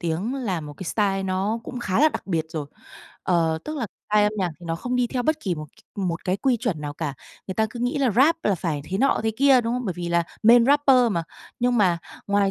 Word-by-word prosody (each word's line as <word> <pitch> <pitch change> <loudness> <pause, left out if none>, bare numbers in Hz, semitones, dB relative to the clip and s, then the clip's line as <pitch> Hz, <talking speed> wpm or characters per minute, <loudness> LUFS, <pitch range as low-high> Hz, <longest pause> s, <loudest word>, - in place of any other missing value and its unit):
tiếng 175 +8 -2
là 205 -11 -2
một 150 -1 -8
cái - - -7
style 195 +1 0
nó 190 +4 -1
cũng 250 -2 -6
khá 190 -2 0
là 310 - +7
đặc - - -6
biệt 165 -5 0
rồi. 155 -3 -5 0.6
Ờ, 165 -3 +1
tức 310 - -5
là 250 -6 -2 0.2
style 210 0 +5
âm 210 - 0
nhạc 185 -4 0
thì 170 - -10
nó 165 0 -2
không 250 +8 -2
đi 250 - +2
theo 250 +1 -2
bất 310 +4 0
kỳ 185 - -1
một 155 -1 -7 0.3
c - - -8
một 175 -4 -2
cái 185 +1 0
quy 255 +4 +1
chuẩn 210 -10 -2
nào 145 -1 -4
cả. 150 -4 -4 0.3
Người 190 - -4
ta 220 +2 +2
cứ 235 - -7
nghĩ 245 +3 0
là 265 -4 +2
Rap 275 - +4
là 205 - +3
phải 160 -4 -2
thế 190 +4 -3
nọ 275 +2 +3
thế 220 - +1
kia, 270 -1 +5
đúng 230 0 -2
không? 250 0 -3
Bởi 190 - -1
vì 175 -1 -4
là 170 0 +2 0.2
main 230 +1 +7
rapper 285 -1 +5 0.2
mà. 170 - 0 0.4
Nhưng 245 0 +2
mà, 180 -4 +3 0.3
ngoài 200 -1 +2
205 Hz, 270 wpm, -24 LUFS, 170-245 Hz, 0.6 s, là